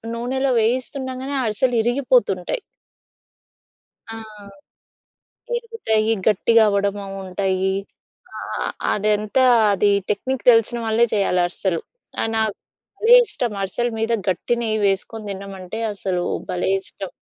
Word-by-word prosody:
నూనెలో 260 +3 -1
వేయిస్తుండగానే 260 +3 -2
అరిసెలు 240 +3 0
ఇరిగిపోతుంటాయి. 280 - +1 1.5
ఆ! 225 - -6 1.4
విరుగుతాయి, 455 - 0 0.2
గట్టిగా 225 +2 +4
అవ్వడము 200 0 0
అవుంటాయి. 190 0 -2 0.6
ఆ - - -6 0.2
ఆ - - -1 0.3
అదంతా 210 +4 +1 0.3
అది 205 +1 +2 0.2
టెక్నిక్ 255 +5 -2
తెలిసిన 230 +1 +2
వాళ్ళే 225 +1 +3
చేయాలి 195 -3 +2
అరిసెలు. 175 -1 -2 0.4
ఆ - - +1
నాకు 220 -2 +1 0.4
భలే 460 +3 +6
ఇష్టం! 245 - -2
అరిసెల 240 +5 -1
మీద 225 +1 0 0.2
గట్టి 185 +6 0
నెయ్యి 220 -2 0
వేసుకొని 210 +2 -2
తినమంటే 195 +1 -7
అసలు 185 -3 -2 0.3
భలే 180 +1 -1
ఇష్టం. 190 -1 -8
220 Hz, 110 wpm, -21 LUFS, 195-245 Hz, 1.5 s, భలే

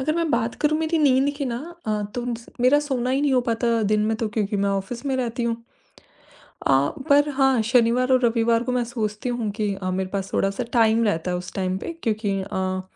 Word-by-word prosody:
अगर 310 +4 0
मैं 335 -2 0
बात 235 -2 0
करूँ 305 +1 +2
मेरी 320 0 0
नींद 275 -1 +3
की 280 - -2
ना 240 -3 -2 0.3
अ, 210 -1 0
तोम्स 240 -1 -4
मेरा 255 +4 +5
सोना 255 -4 -2
ही 270 +2 +1
नहीं 290 -2 +2
हो 255 - +4
पाता 230 0 +1
दिन 215 - +3
में 220 - 0
तो 225 -1 -2
क्योंकि 210 -2 -1
मैं 200 0 +1
ऑफिस 195 +6 -3
में 265 - 0
रहती 245 -1 -2
हूँ। 230 -1 0 1.1
अ, - - +3 0.4
पर 290 +1 +5
हाँ, 270 -3 +3
शनिवार 245 +2 +3
और 255 - +5
रविवार 230 0 +2
को 250 - -2
मैं 250 -1 +1
सोचती 220 -1 -3
हूँ 240 -3 -2
कि 205 -2 0
अ, 185 - -1
मेरे 185 0 -2
पास 195 -1 -4
थोड़ा-सा 195 +5 0
टाइम 230 -1 +4
रहता 180 -4 0
है 180 - 0
उस 180 0 -7
टाइम 185 -1 -1
पे 335 - -5
क्योंकि 215 -3 -1
अ, 185 0 -2
235 Hz, 220 wpm, -23 LUFS, 210-260 Hz, 1.1 s, मेरा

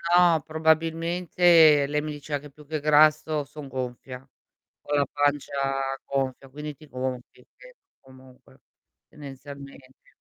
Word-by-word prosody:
no, 170 -3 +5
probabilmente, 160 -1 +3
lei 150 +1 -1
mi 155 0 -5
diceva 145 0 -5
che 150 0 -13
più 150 +1 -17
che 155 +1 -3
grasso 155 0 +3
son 145 0 -11
gonfia, 130 -1 -6 0.6
ho 145 - -3
la 140 -1 +2
pancia 145 -1 0 0.5
gonfia, 135 -1 -3
quindi 150 +2 -7
ti 155 +2 -17
gonfi 130 -1 -6
che - - -16 0.2
comunque 130 -1 -19 0.5
tendenzialmente 140 -2 -12
145 Hz, 125 wpm, -25 LUFS, 135-155 Hz, 0.6 s, no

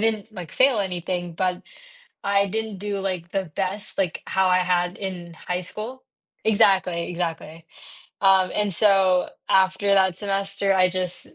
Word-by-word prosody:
didn't, 220 -1 -1
like, 175 -6 -7
fail 260 -4 +4
anything, 180 -2 -3
but 180 +1 -1 0.6
I 200 0 +3
didn't 220 0 -3
do, 205 0 -3
like, 185 -3 -3
the 195 -1 -1
best 195 +3 -3
like, 185 -5 -1
how 190 0 +1
I 180 0 +4
had 180 0 0
in 180 -3 -6
high 180 +2 -4
school 225 +8 -6 0.4
Exactly, 190 -5 +3
exactly, 165 -2 -5 0.6
um, 190 -1 +4
and 210 -2 +1
so 190 -1 +3 0.2
after 190 +1 +2
that 190 -2 +3
semester, 195 0 0
I 185 -1 +4
just 180 -1 -3
190 Hz, 150 wpm, -23 LUFS, 180-200 Hz, 0.6 s, fail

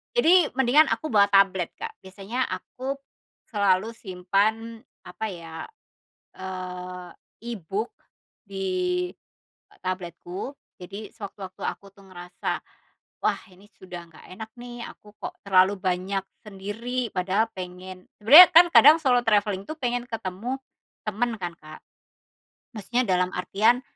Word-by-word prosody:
jadi 360 -7 +5
mendingan 270 +5 +5
aku 310 - -1
bawa 205 -5 +5
tablet, 195 -3 +4
Kak. 450 0 -6
Biasanya 200 +7 -4
aku 270 +2 -5 0.5
selalu 205 +1 +1
simpan, 215 +5 -1 0.2
apa 220 +5 -5
ya, 165 -2 -8 0.7
eee, 180 -1 -7 0.4
e-book 200 +4 -4 0.5
di 185 -2 -1 0.7
tabletku. 185 - -5 0.2
Jadi, 200 +4 -8
sewaktu-waktu 195 -3 -9
aku 200 - -4
tuh 195 -1 -18
ngerasa, 180 -1 -5 0.6
"Wah, - - +1
ini 200 +3 -19
sudah 175 -2 -10
nggak 160 - -16
enak 220 +2 -8
nih, 240 -1 -8
aku 210 0 -16
kok - - -6
terlalu 190 +1 +5
banyak 185 +1 -1 0.2
sendiri, 220 +5 -4
padahal 190 +4 +1
pengen" 185 0 -9
sebenernya 290 +12 +11
kan 345 +2 +9
kadang 300 +4 +9
solo 250 -4 +3
travelling 205 -2 +1
tuh 310 - -5
pengen 245 -2 -2
ketemu 225 +4 -4 0.5
temen 220 +3 -1
kan, 175 -1 -3
Kak. 155 0 -11 1.0
Maksudnya 240 +5 0
dalam 180 -1 +2
artian 220 +7 +2
200 Hz, 120 wpm, -25 LUFS, 185-235 Hz, 1.0 s, sebenernya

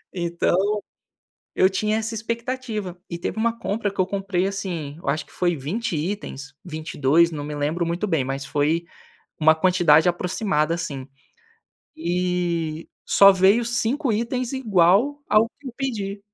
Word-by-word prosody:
Então, 180 +4 +1 0.8
eu 185 - +5
tinha 210 +3 0
essa 225 +1 -3
expectativa 230 -3 -4
e 170 - -4
teve 175 +4 -4
uma 230 +1 +1
compra 210 -2 -2
que 200 - -14
eu 185 - +4
comprei, 195 -1 -1
assim, 180 -7 -4
eu - - -3
acho 155 - -1
que - - -22
foi 175 -1 +1
20 175 - -3
itens, 155 -4 -4
22, 160 -1 +1
não 150 -2 -5
me 150 0 -5
lembro 155 +4 -1
muito 170 +5 -1
bem, 160 -9 +1
mas 135 +1 -4
foi 155 +5 0 0.5
uma 160 0 +6
quantidade 175 -1 +4
aproximada, 175 -3 0
assim, 145 -6 -5 0.9
e 170 -2 -1 0.2
só 200 0 +7
veio 195 +5 +4
5 240 +4 0
itens 240 +3 -2
igual 225 +3 +3
ao 215 +2 +5
que 285 - -10
eu 250 - -7
pedi. 210 -7 -3
185 Hz, 150 wpm, -23 LUFS, 165-215 Hz, 0.9 s, só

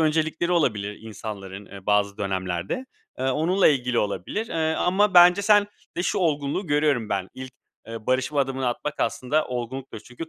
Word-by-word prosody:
öncelikleri 160 +2 +1
olabilir 105 - 0
insanların, 100 -3 -8
eee, 100 -1 -12
bazı 100 -1 +2
dönemlerde. 95 - -3 0.3
Eee, - - -2
onunla 175 +8 +3
ilgili 125 -4 +1
olabilir, 105 - -2
eee, 160 -1 0
ama 195 +4 +2
bence 180 +3 +7
sen 205 0 +5 0.3
de 175 - 0
şu - - 0
olgunluğu 155 +1 0
görüyorum 145 -6 +1
ben. 95 -2 -2
İlk, 130 -1 -8 0.3
eee, 115 -1 -8
barışma 130 +3 +1
adımını 135 -1 -1
atmak 145 +4 -3
aslında 150 +5 0
olgunluktur. 125 -1 -5
Çünkü 125 +9 -9
130 Hz, 160 wpm, -24 LUFS, 105-160 Hz, 0.3 s, bence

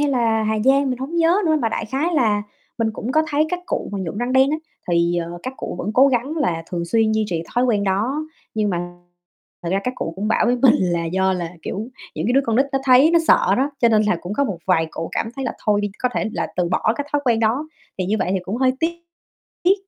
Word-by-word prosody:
hay 290 - +2
là 230 -4 +1
Hà 220 0 0
Giang, 270 0 +4
mình 250 - -3
hổng 285 +6 -4
nhớ 335 +2 +4
nữa, 315 -1 +3
mà 230 - +1
đại 225 - -3
khái 295 +9 -1
là 215 -7 +2 0.4
mình 225 -1 +1
cũng 230 +4 -4
có 315 - +4
thấy 300 +2 +2
các 360 - -1
cụ - - -2
mà 200 - -2
nhuộm 185 0 -4
răng 245 +2 -1
đen 265 +1 +4
á, 305 - +1 0.3
thì, 170 0 +2
ờ, 170 0 -4
các 255 +1 -5
cụ - - -5
vẫn 205 - -2
cố 260 +4 +6
gắng 265 +4 -1
là 170 - 0
thường 170 -1 -2
xuyên 220 +5 +2
duy 220 0 +1
trì 165 -2 -2
thói 245 - +3
quen 215 -5 +1
đó. 220 +11 0 0.3
Nhưng 215 -2 +1
mà 175 -1 -3 0.7
thật 170 - -3
ra 195 - +1
các 250 0 -2
cụ 165 - -3
cũng 210 +3 -2
bảo - - +2
với 245 - +2
mình 250 0 +5
là 175 -2 0
do 190 +3 +1
là, 175 -2 -3
kiểu, 215 +4 -4 0.3
những - - -3
cái 245 - +2
đứa 270 - +5
con 225 -1 +1
nít 270 +2 +3
nó 270 - +2
thấy 265 +4 +6
nó 340 - +5
sợ 195 - +5
đó, 275 +3 +1
cho 235 - +5
nên 215 -2 +4
là 210 -4 +1
cũng 180 - -6
có 280 - +1
một 195 -8 -3
vài 165 -3 +3
cụ 165 - -5
cảm - - -1
thấy 270 - -3
là 235 - -2
thôi 205 -1 +3
đi, 205 0 -2
có 250 - +1
thể - - 0
là - - -2
từ 180 -1 +1
bỏ 200 +4 +1
cái 285 - -3
thói 290 - +2
quen 235 -3 +2
đó, 240 +8 0 0.3
thì 185 - 0
như 210 +3 +1
vậy 185 - -1
thì - - +1
cũng 195 +5 -3
hơi 255 0 +3
tiếc 330 +1 0 0.7
tiếc. 370 +2 +5
225 Hz, 280 wpm, -21 LUFS, 190-270 Hz, 0.7 s, cố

